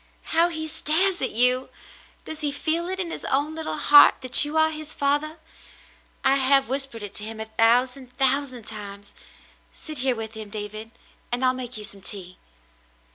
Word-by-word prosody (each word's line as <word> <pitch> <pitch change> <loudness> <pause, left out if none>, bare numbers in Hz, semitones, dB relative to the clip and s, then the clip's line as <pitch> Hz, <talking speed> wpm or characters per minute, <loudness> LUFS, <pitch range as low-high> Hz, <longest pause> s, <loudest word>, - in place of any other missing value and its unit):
How 335 +2 +4
he 315 -2 -5
stares 350 +5 0
at - - -1
you! 250 +3 +3 0.6
Does 315 0 -7
he 295 -1 -1
feel 330 +4 -2
it 380 0 -5
in 345 -3 -3
his - - -5
own 285 +3 -1
little 320 -1 -4
heart 290 -1 +6
that 255 +1 +9
you 295 +2 -2
are 315 0 +3
his 310 0 -8
father? 290 +3 -1 0.9
I 270 +1 +3
have 270 0 +3
whispered 265 -4 -5
it 205 -1 -9
to 210 - -7
him 220 +1 -7
a 220 - -5
thousand, 250 +3 0
thousand 265 -2 0
times. 205 -1 -8 0.6
Sit 310 -4 -7
here 255 -1 0
with 225 -1 -7
him, 220 -2 -9
David, 215 +1 -6 0.4
and 245 +2 -1
I'll 255 - +3
make 255 -2 -6
you 210 - -6
some 200 -1 -5
tea." 185 -2 -7
260 Hz, 185 wpm, -23 LUFS, 225-305 Hz, 0.9 s, that